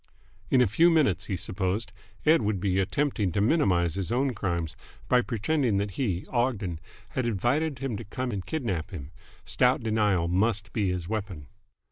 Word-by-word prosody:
In 130 - +5
a 125 - +5
few 160 - +4
minutes, 140 - +2
he 95 - -1
supposed, 95 +3 -2 0.3
Ed. 160 0 +5
would 105 -2 0
be 95 0 +1
attempting 105 -1 0
to 100 - 0
minimise 95 - +2
his 95 +2 -3
own 130 +2 +1
crimes, 85 -6 -2 0.3
by 125 -1 +4
pretending 120 0 0
that 100 0 -1
he, 95 -5 -2
Ogden, 115 -9 -1 0.3
had 130 -2 -2
invited 130 - 0
him 135 -5 -3
to 115 - -6
come 125 +4 -4
and 100 -4 -3
kidnap 105 - -3
him. 80 -7 -8 0.3
Stout 125 -1 +2
denial 105 -6 +2
must 100 +3 0
be 105 -4 +1
his 90 -2 -3
weapon. 100 -8 -4
105 Hz, 170 wpm, -27 LUFS, 95-125 Hz, 0.3 s, In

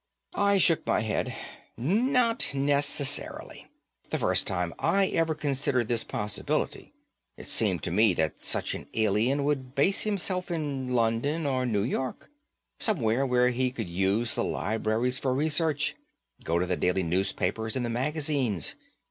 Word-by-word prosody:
I 200 0 +3
shook 170 -3 +3
my - - +2
head. 110 -2 -2 0.4
"Not 230 - +2
necessarily. 140 0 0 0.4
The - - -1
first - - +1
time 90 -2 -2
I 195 -1 +2
ever 165 -1 0
considered 140 -5 -1
this 120 -2 +1
possibility, 105 -1 -2 0.5
it - - -10
seemed - - +1
to - - -2
me 105 0 +3
that 80 -1 -1
such - - +1
an - - -7
alien 110 +6 +1
would 135 -2 -2
base 185 +8 +2
himself 190 -3 -1
in 145 -6 -3
London 120 +8 0
or 130 -2 0
New 105 -4 0
York. 130 - -4 0.5
Somewhere 135 - +1
where 125 0 +3
he 125 +1 0
could 110 -8 -6
use 95 +6 0
the - - 0
libraries 110 +3 -1
for 130 -2 0
research, 155 0 +1 0.5
get 85 +2 0
the 90 - 0
daily 90 +1 0
newspapers 95 +5 -1
and 125 -2 -1
the - - -3
magazines. 135 - 0
130 Hz, 145 wpm, -27 LUFS, 110-150 Hz, 0.5 s, I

